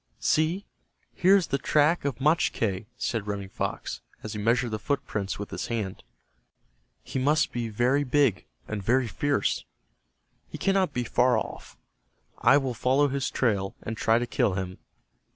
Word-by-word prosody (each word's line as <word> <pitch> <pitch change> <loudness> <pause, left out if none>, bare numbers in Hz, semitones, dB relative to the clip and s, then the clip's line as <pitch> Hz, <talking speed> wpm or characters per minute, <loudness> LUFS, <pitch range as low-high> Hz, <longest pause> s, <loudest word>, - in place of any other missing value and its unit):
"See, 165 +6 +1 0.5
here 190 +2 +5
is 190 -3 +3
the 140 -2 -1
track 150 +2 +2
of 140 -2 -2
Machque," 115 - +1
said 110 -3 -2
Running 100 -2 -4
Fox, - - -4 0.2
as 110 - -5
he 105 - -4
measured 115 +3 +1
the 110 - -2
footprints 110 -7 -2
with 105 - -6
his - - -4
hands. 110 -5 -3 1.0
"He - - -3
must 150 +4 +2
be 120 -2 -3
very 125 +6 +2
big, 135 -7 +2 0.2
and 110 -2 -3
very 125 +6 +2
fierce. 145 +5 0 0.9
He - - -7
cannot 195 -1 +2
be 125 - -2
far 125 +2 +3
off. - - -6 0.6
I 130 +4 +6
will 135 -3 -1
follow 130 +5 +2
his 135 0 -1
trail, 100 -6 0
and 110 - -4
try 115 +1 +3
to 120 - 0
kill 105 -5 +1
him. 95 -1 -4
125 Hz, 160 wpm, -27 LUFS, 105-145 Hz, 1.0 s, I